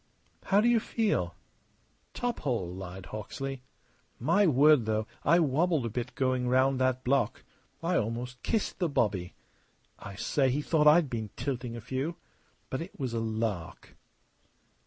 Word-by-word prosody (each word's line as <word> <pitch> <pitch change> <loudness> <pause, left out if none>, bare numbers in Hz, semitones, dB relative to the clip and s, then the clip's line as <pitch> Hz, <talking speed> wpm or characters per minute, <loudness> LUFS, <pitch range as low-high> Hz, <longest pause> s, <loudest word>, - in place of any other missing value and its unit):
"How 200 +1 +4
do 230 - +3
you 240 -1 +5
feel?" 205 - -1 0.8
"Top 245 -1 -2
hole," 115 -11 -2
lied 95 0 -8
Hawksley. 130 +6 -6 0.6
"My 170 - +3
word, 145 -4 +5
though, 110 0 0 0.2
I 165 +4 +5
wobbled 160 -2 +2
a - - -1
bit 120 +1 -4
going 130 -1 0
round 130 +1 +3
that 130 0 +1
block. 125 -3 +1 0.4
I 175 +1 +2
almost 120 +3 -3
kissed 220 -4 -1
the 175 -3 +1
bobby. 100 -10 0 0.6
I 100 - -8
say, 135 +6 +1
he 145 +4 0
thought 150 -1 +3
I'd 155 +1 +6
been 110 -4 -4
tilting 125 -4 -3
a 120 - -6
few. 130 +8 -3 0.6
But 130 - -2
it 170 0 -9
was 130 -4 -2
a 115 - 0
lark!" 110 -6 -3
130 Hz, 155 wpm, -29 LUFS, 115-155 Hz, 0.8 s, I'd